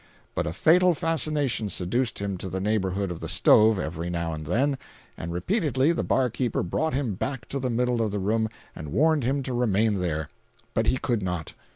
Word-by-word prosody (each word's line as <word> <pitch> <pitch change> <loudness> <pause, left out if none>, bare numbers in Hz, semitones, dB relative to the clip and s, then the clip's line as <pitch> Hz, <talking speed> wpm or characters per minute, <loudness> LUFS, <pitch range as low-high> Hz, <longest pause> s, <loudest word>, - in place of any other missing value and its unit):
But - - -1
a - - -1
fatal 175 - +4
fascination 150 - 0
seduced 115 +8 -1
him 100 -1 -2
to 95 - -5
the 95 - -3
neighborhood 100 -2 0
of 85 - -6
the - - -5
stove 110 0 +5
every 85 -1 -3
now 85 -1 -2
and 75 -1 -6
then, 130 - +1 0.4
and 85 - -6
repeatedly 145 - +1
the 170 - -1
bar 130 -1 +2
keeper 120 0 -1
brought 155 - -1
him 130 -6 -1
back 130 +4 -4
to 140 - -2
the 130 -1 -1
middle 120 0 +1
of 110 - +1
the 105 - -3
room 110 +3 0 0.3
and 75 -2 -7
warned 155 - +3
him 135 +3 0
to 130 - -3
remain 110 -3 +2
there. 80 -4 -2 0.4
But - - +1
he - - +3
could 120 -4 -1
not. 90 -4 -3
110 Hz, 205 wpm, -26 LUFS, 90-135 Hz, 0.4 s, stove